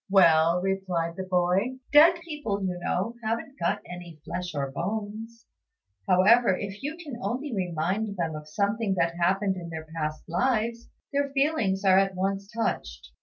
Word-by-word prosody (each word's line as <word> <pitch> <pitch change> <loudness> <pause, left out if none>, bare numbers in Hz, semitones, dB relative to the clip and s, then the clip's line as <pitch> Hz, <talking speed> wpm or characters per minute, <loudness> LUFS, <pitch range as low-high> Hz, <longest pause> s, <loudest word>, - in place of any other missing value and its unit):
"Well," 170 -2 +5
replied 185 -4 -1
the 190 - -4
boy, 185 +7 +1 0.2
"dead 320 +4 +8
people, 280 -12 -3
you 180 -1 -2
know, 190 +6 -1
haven't 230 +5 -3
got 170 - 0
any 175 -3 -9
flesh 175 -1 -4
or 140 -1 -2
bones; 215 - -5 0.6
however, 190 +2 +5
if 200 0 -6
you 295 +4 -4
can 290 -9 -8
only 265 +2 -3
remind 190 +3 -1
them 165 -2 -1
of 150 0 -8
something 200 +4 0
that 170 -2 +1
happened 190 +2 +2
in 170 -2 -7
their 160 -1 -6
past 155 -1 -3
lives, 230 +5 0 0.2
their 280 0 +1
feelings 235 -10 +1
are 190 0 +6
at 195 -1 +1
once 195 +1 -2
touched. - - -3
195 Hz, 160 wpm, -27 LUFS, 175-230 Hz, 0.6 s, dead